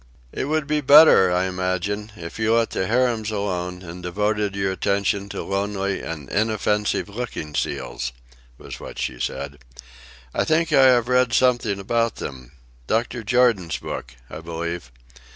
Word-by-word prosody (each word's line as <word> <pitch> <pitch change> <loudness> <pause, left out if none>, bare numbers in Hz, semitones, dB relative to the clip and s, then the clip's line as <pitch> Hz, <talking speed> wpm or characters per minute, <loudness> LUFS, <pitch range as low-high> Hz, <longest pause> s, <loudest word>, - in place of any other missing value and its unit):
"It - - -3
would 155 +1 0
be 150 +1 0
better, 145 - +7
I 90 +1 +2
imagine, 95 +3 -2
if 85 +3 -8
you 110 +1 +3
let 115 -1 +1
harems 115 +2 +1
alone 90 -3 -3
and 90 +1 -9
devoted 105 +3 -1
your 95 -1 0
attention 100 +1 0
to - - -5
lonely 100 0 -2
and 75 -4 -6
inoffensive 105 - 0
looking 105 -8 -6
seals," 65 -3 -3 0.5
was - - -9
what - - -9
she 60 -2 -3
said. 70 +2 -4 0.7
"I - - +1
think 160 0 +1
I 135 -2 +7
have 120 -2 +4
read 125 -1 +2
something 120 -6 +2
about 115 +3 0
them. 65 -2 -8 0.3
Dr. 115 +2 0
Jordan's 110 - +2
book, - - -7
I - - -8
believe. 85 -4 -5
100 Hz, 150 wpm, -23 LUFS, 90-115 Hz, 0.7 s, better